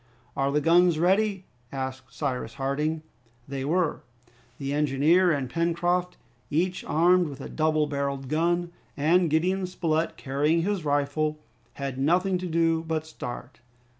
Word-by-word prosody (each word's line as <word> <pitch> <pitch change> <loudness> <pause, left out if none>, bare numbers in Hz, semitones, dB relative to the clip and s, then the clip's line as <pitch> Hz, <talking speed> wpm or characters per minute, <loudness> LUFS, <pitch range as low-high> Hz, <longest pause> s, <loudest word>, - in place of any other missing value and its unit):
"Are 135 0 +1
the 150 +1 +1
guns 170 +1 +4
ready?" 190 +3 +2 0.3
asked 130 -1 -5
Cyrus 130 -5 -3
Harding. 150 +4 -1 0.4
They 135 -1 -4
were. 165 +3 0 0.6
The 140 0 -3
engineer 150 +5 +3
and 140 -4 -1
Pencroft, 175 +4 0 0.3
each 180 +5 0
armed 175 +2 +3
with 140 -2 -8
a - - -6
double 155 -1 +1
barreled 140 -2 -3
gun, 170 +4 0 0.3
and 165 +4 +3
Gideon 185 +5 +1
Spilett 165 -3 -1
carrying 150 +5 +1
his 200 -2 -1
rifle, 145 +1 0 0.4
had 135 -2 -5
nothing 180 +6 +2
to 180 - -4
do 165 -1 +2
but 160 -1 -1
start. 125 -8 -8
155 Hz, 135 wpm, -26 LUFS, 140-175 Hz, 0.6 s, guns